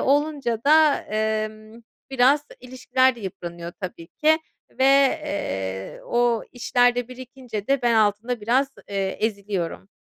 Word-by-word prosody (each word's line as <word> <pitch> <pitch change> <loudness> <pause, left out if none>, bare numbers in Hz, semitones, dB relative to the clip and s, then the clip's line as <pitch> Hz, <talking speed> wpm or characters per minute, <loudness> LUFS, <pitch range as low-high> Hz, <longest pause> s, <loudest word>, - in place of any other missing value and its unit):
olunca 280 -5 0
da, 305 0 +6
emm, 215 +1 -3 0.3
biraz 270 +3 +3 0.2
ilişkiler 255 0 +1
de - - -11
yıpranıyor 175 -3 -7
tabii 175 -3 -7
ki. 315 +1 +2 0.3
Ve, 265 - -1 0.4
eee, 95 - -4
o 240 -1 +1
işler 245 0 +2
de 245 -1 -3
birikince 250 -4 -8
de 275 -1 +1
ben 240 -1 +3
altında 220 +2 +1
biraz, 250 +6 +2 0.2
eee, 195 -1 -2
eziliyorum. 200 -4 -3
235 Hz, 125 wpm, -23 LUFS, 205-260 Hz, 0.4 s, da